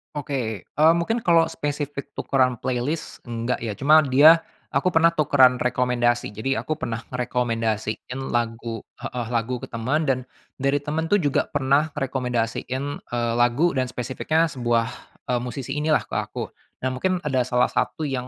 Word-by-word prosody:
Oke. 130 -8 -3
Eee, 155 +3 +4
mungkin 170 +8 0
kalau 165 -6 +3
spesifik 145 -2 -4
tukeran 130 -2 +1
playlist 130 +5 -3
enggak 115 +1 -2
ya 115 -2 -3
cuma 150 +6 +6
dia 145 +5 +7 0.3
aku - - +1
pernah 165 0 +5
tukeran 140 -5 +4
rekomendasi, 120 -2 +1
jadi 130 +5 -1
aku 155 - -2
pernah 115 -6 -3
ngerekomendasiin 115 -1 -2
lagu 115 -1 -2 0.2
heeh, 120 -2 -4
lagu 120 +1 -1
ke - - -5
temen 125 +7 0
dan 130 -2 +2 0.4
dari 140 +2 +1
temen 160 +2 -2
tuh 205 - +6
juga 145 -5 +1
pernah 140 +2 +2
rekomendasiin, 125 -1 -2 0.2
eee, 120 -1 -2
lagu 120 +9 +3
dan 130 -1 +1
spesifiknya 155 +7 0
sebuah, 120 -3 +1 0.4
eee, 125 -1 +1
musisi 130 +2 -5
inilah 155 0 +2
ke - - -6
aku. - - -5 0.3
Nah 130 - +1
mungkin 185 +8 0
ada 135 -3 +1
salah 125 -1 +3
satu 160 - -1
yang 130 -2 -3
130 Hz, 155 wpm, -24 LUFS, 120-150 Hz, 0.4 s, dia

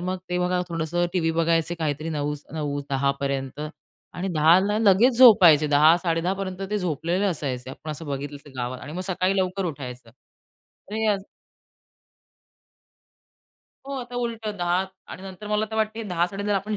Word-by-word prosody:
मग 185 +1 -2
ते 180 - 0
बघा 180 0 +1
थोडंसं 170 +1 -1
टीव्ही 165 -3 +1
बघायचे 165 0 +1
काहीतरी 155 -1 -2
9 150 -1 -2 0.2
9 145 -2 -2
10 140 0 +2
पर्यंत 135 0 -3 0.5
आणि 185 +2 -3
10ला 185 +7 +4
लगेच 225 +4 +4
झोपायचे. 180 - +8
10, 150 +3 +6
10:30 180 +3 0 0.3
ते 210 - 0
झोपलेले 175 +2 -1
असायचे. 130 -8 -3
आपण 155 +3 -8
असं 155 +1 -7
बघितलं 145 +1 -5 0.2
गावात 125 +1 -3
आणि 150 +2 -8
मग 180 - -4
सकाळी 185 +1 0
लवकर 190 +1 -1
उठायचं 125 -6 -7 0.8
हे 220 0 0
असं 195 0 -7 2.6
हो 275 - -5
आता 245 0 -9
उलटं 225 -3 -3
10 175 -1 +1 0.4
आणि 185 - -9
नंतर 195 +2 -9
मला 210 +1 +1
तर 220 - -4
वाटते 220 +1 -1
10, 175 -5 0
10:30 200 +2 -2
आपण 210 +2 -2
175 Hz, 155 wpm, -24 LUFS, 150-195 Hz, 2.6 s, झोपायचे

